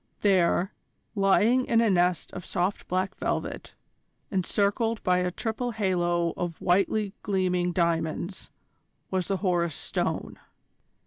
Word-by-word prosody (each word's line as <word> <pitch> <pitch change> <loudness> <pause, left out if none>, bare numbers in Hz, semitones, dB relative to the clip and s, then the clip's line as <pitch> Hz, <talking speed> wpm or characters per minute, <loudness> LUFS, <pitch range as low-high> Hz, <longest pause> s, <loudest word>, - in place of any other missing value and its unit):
There, 190 -1 +3 0.4
lying 220 +5 +3
in 230 - +3
a 230 -3 +3
nest 180 -1 +1
of 180 - -6
soft 185 +2 -2
black 185 +1 -1
velvet, - - -3 0.6
encircled 205 +4 0
by 180 0 +3
a 180 0 0
triple 225 +6 -3
halo 175 -5 +1
of 175 -2 -4
whitely 195 +3 +1
gleaming 180 -3 0
diamonds, 170 +1 -1 0.6
was 185 -2 0
the 195 - 0
Horus 170 -4 +1
Stone. - - -3
185 Hz, 120 wpm, -27 LUFS, 175-205 Hz, 0.6 s, There